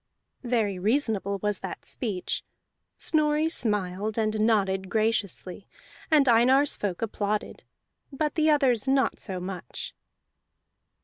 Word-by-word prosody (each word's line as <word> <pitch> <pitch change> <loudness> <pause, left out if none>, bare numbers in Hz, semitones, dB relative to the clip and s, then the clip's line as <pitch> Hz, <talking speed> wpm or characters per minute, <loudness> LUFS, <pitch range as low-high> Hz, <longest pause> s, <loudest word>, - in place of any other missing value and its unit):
Very 225 -7 0
reasonable 210 -2 0
was 210 -2 0
that 190 - -7
speech: 205 -8 -3 0.5
Snorri 305 0 +2
smiled 210 - -1
and 215 -1 0
nodded 195 -4 +1
graciously, 215 -4 -1 0.4
and 300 -4 +5
Einar's 255 +4 +5
folk 200 0 -3
applauded, 210 -1 -2 0.5
but 300 +1 -1
the 315 -1 +2
others 265 -6 +3
not 270 0 +2
so 190 -2 -4
much. 180 -6 -6
220 Hz, 110 wpm, -27 LUFS, 195-265 Hz, 0.5 s, and